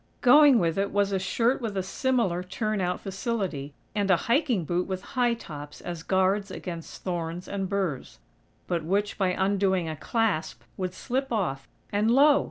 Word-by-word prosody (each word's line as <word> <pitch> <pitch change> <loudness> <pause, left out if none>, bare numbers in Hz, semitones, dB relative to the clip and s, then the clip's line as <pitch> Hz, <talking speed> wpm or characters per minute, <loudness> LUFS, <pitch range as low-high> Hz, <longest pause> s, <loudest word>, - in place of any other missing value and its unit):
Going 285 +1 +7
with 170 -2 +1
it 200 0 +1
was 200 0 +1
a 195 - +1
shirt 235 +7 +1
with 215 -4 -3
a 190 - 0
similar 210 -4 0
"turn 210 +3 -2
out" 180 0 -1
facility, 190 - -3 0.2
and 205 -2 0
a 185 - +7
hiking 235 - +2
boot 175 +3 -1
with 190 0 -4
high 245 -2 +2
tops 145 -8 -9
as 170 -2 -6
guards 190 +3 +1
against 170 -3 -7
thorns 175 -1 -3
and 195 -2 -3
burs; 190 - -2 0.5
but 170 -2 -1
which, 200 +6 -1
by 190 - +3
undoing 190 -2 +1
a 160 - -3
clasp, 210 0 -1
would 185 -1 -4
slip 265 +2 -2
off; 155 - -1 0.2
and, 210 +2 +2
LO!! 280 +4 +6
195 Hz, 175 wpm, -27 LUFS, 175-225 Hz, 0.5 s, Going